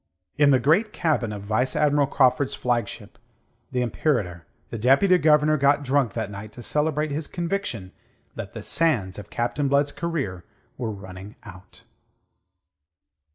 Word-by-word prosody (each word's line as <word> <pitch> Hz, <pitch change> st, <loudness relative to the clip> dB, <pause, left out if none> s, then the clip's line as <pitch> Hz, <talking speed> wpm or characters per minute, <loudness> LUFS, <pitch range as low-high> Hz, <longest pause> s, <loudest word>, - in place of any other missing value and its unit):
In 145 Hz, -1 st, +4 dB
the 135 Hz, -, +6 dB
great 170 Hz, -, +2 dB
cabin 150 Hz, -9 st, 0 dB
of 100 Hz, -1 st, -6 dB
Vice 110 Hz, +5 st, 0 dB
Admiral 145 Hz, -1 st, +3 dB
Craufurd's 130 Hz, 0 st, +2 dB
flagship, 120 Hz, -4 st, -3 dB, 0.5 s
the 125 Hz, -1 st, 0 dB
Imperator, 105 Hz, -, -1 dB, 0.2 s
the 115 Hz, -, -4 dB
Deputy 140 Hz, -, +4 dB
Governor 155 Hz, -1 st, +4 dB
got 140 Hz, +1 st, +3 dB
drunk 135 Hz, -5 st, +1 dB
that 110 Hz, -3 st, -3 dB
night 100 Hz, +1 st, -8 dB
to 120 Hz, -, -10 dB
celebrate 150 Hz, +1 st, 0 dB
his 150 Hz, +1 st, -3 dB
conviction 170 Hz, -, -3 dB, 0.4 s
that -, -, -7 dB
the -, -, -6 dB
sands 115 Hz, -, +1 dB
of 105 Hz, -, -10 dB
Captain 120 Hz, +4 st, -1 dB
Blood's 140 Hz, +1 st, +2 dB
career 140 Hz, -, -3 dB, 0.3 s
were 120 Hz, -3 st, -3 dB
running 95 Hz, 0 st, -9 dB
out. 95 Hz, -2 st, -14 dB
130 Hz, 145 wpm, -24 LUFS, 105-150 Hz, 0.5 s, the